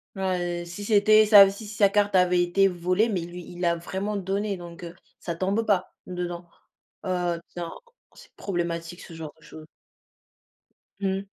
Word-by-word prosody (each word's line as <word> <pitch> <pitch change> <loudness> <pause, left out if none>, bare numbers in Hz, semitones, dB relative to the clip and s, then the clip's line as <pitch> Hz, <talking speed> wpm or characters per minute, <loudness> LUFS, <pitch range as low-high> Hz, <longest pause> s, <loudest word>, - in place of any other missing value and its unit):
Ouais. 175 -2 -2
Si 175 +4 -8
c'était 215 0 +5
ça, 200 -2 +9
si 205 +2 -8
si 210 - -8
sa 200 -2 +4
carte 205 -1 +1
avait 180 -1 +4
été 195 +3 +3
volée, 180 +5 +1
mais 185 -5 -1
lui, 175 +1 -8
il 175 0 -10
l'a 170 -1 +2
vraiment 190 +5 -4
donné, 200 +1 -2
donc 175 0 -10
heu, 170 0 -8 0.2
ça 170 - -4
tombe 195 +5 0
pas 190 -3 +1
dedans, 175 -1 -5 0.6
heu, 175 -2 -1
tiens, 170 -1 -6 0.4
c'est - - -17
problématique 175 -2 -4
ce 170 - -11
genre 160 -2 -8
de - - -23
chose. 155 0 -12 1.4
Mmh. 195 0 -1
180 Hz, 170 wpm, -25 LUFS, 175-200 Hz, 1.4 s, ça